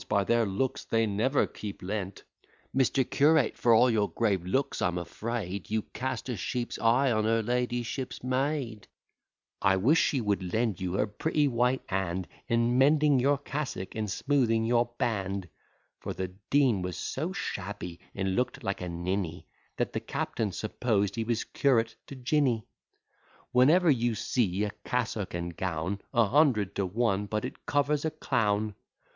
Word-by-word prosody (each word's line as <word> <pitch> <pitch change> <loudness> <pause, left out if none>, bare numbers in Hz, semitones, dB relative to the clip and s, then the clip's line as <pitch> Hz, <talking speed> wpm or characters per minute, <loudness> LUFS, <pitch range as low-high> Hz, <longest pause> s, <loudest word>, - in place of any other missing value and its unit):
by 100 -1 +3
their 115 +2 +2
looks, 120 +7 -1
they 115 0 +2
never 110 +7 +2
keep 100 -3 -8
Lent: 100 0 -4 0.5
Mister 130 +1 +3
curate, 145 0 +3
for 120 - +2
all 125 - +6
your 110 -4 +2
grave 100 -6 0
looks, 130 +10 -1
I'm 90 0 +1
afraid 100 +2 -4
You 110 0 0
cast 130 +3 -3
a 125 - -2
sheep's 120 +5 -3
eye 125 +4 +3
on 110 -1 +1
her 115 0 +2
ladyship's 120 +2 -2
maid: 130 -4 -1 0.7
I 95 0 +4
wish 140 - +4
she 140 - +1
would 100 -5 -1
lend 110 -5 0
you 90 -1 -2
her 100 - +2
pretty 145 +8 0
white 125 +1 +1
hand 95 -1 -2 0.2
In 115 +2 +2
mending 145 0 +5
your 140 +3 +3
cassock, 135 -8 -4
and 110 -1 -3
smoothing 115 -1 +1
your 120 +1 +3
band: 100 -4 -1 0.5
(For - - -5
the 95 -1 -3 0.2
Dean 130 -9 +3
was 90 -1 -4
so 155 +7 -3
shabby, 95 - -5 0.2
and 95 -1 -1
look'd 125 +2 -1
like 100 -3 -2
a 90 - -4
ninny, 85 0 -3 0.3
That - - -1
the - - -1
captain 110 -3 -2
supposed 105 0 0
he 115 - -1
was 115 0 -1
curate 115 -5 +1
to 140 - -8
Jinny.) 130 -3 +1 0.9
'Whenever 155 +7 +5
you 120 -3 +1
see 105 -3 0
a 105 - -1
cassock 115 -7 -2
and 85 0 -4
gown, 90 +3 -2
A 115 -1 +4
hundred 120 -5 +3
to 100 -2 +1
one 105 0 0
but 105 +1 -2
it - - -9
covers 145 0 +1
a 160 - +1
clown. 110 -8 0
115 Hz, 165 wpm, -29 LUFS, 100-130 Hz, 0.9 s, all